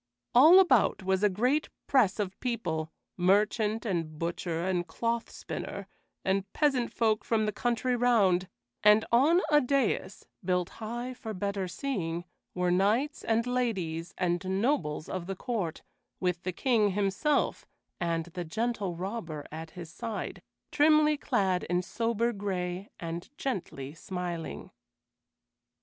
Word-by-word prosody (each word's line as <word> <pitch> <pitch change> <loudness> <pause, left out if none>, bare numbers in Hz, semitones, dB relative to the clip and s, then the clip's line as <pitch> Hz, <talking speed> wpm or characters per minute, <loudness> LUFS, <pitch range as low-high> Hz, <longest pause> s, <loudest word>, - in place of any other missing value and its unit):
All 315 +10 +9
about 260 - +4
was 190 0 +1
a 210 - +5
great 250 +10 +1 0.2
press 235 -8 +3
of 195 -3 -3
people, 165 -11 -2 0.3
merchant 210 +4 +2
and 165 -6 -2
butcher 170 +1 -2
and 180 -2 0
cloth 230 +5 -2
spinner, - - -6 0.4
and 195 +1 0
peasant 270 -6 +1
folk 220 -2 +1
from 220 -2 +1
the 210 - 0
country 240 +3 0
round; 205 -7 +3 0.4
and 210 +1 +6
on 295 +10 +5
a 295 0 +6
dais, 255 -6 0 0.2
built 180 -1 0
high 240 +3 -4
for 220 -3 -7
better 200 0 -2
seeing, 175 -7 -3 0.3
were 180 0 +1
knights 215 +11 +1
and 230 +1 +1
ladies 195 -9 -2
and 175 -1 0 0.2
nobles 205 - 0
of 185 -2 -4
the 195 - -3
court, 190 -6 -3 0.4
with 180 -2 0
the 185 - -2
King 210 0 +2
himself, 205 +9 0 0.3
and 165 -2 -1
the 180 -1 -3
Gentle 205 +1 -2
Robber 175 -5 -5
at 160 +1 -7
his 170 -2 -7
side, 225 -1 -5 0.3
trimly 305 0 +5
clad 195 -10 0
in 180 +1 0
sober 230 +3 0
gray 190 -2 -3
and 170 0 -5
gently 150 - -4
smiling. 175 -1 -5
200 Hz, 135 wpm, -29 LUFS, 180-240 Hz, 0.4 s, All